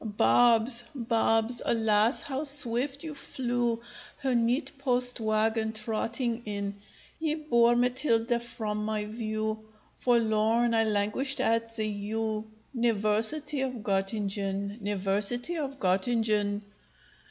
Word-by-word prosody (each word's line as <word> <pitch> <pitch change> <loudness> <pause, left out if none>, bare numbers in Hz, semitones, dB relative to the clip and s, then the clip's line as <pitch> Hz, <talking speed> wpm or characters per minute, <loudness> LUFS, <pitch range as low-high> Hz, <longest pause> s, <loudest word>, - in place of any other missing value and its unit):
_] 210 -1 -7
Barbs! 235 - +5
barbs! 230 -1 0
alas! 220 +1 +2
how 275 -1 -4
swift 275 0 +2
you 315 -2 -6
flew, 245 -4 -2 0.4
Her 265 -2 -1
neat 240 +5 +1
post 250 -2 +2
wagon 220 0 0
trotting 230 +2 -2
in! 200 -1 -4 0.4
Ye 315 -1 -1
bore 240 -6 +3
Matilda 240 -1 +1
from 220 -3 -5
my 215 -1 -2
view; 215 0 -3 0.4
Forlorn 230 0 +2
I 225 0 +3
languished 215 +6 0
at 230 0 0
the 220 -2 -1
U 215 +1 -3 0.2
niversity 235 +6 +1
of 265 -1 -2
Gottingen, 200 +1 -2
niversity 205 - +1
of 275 -4 -4
Gottingen. 205 +1 0
225 Hz, 110 wpm, -28 LUFS, 215-245 Hz, 0.4 s, Barbs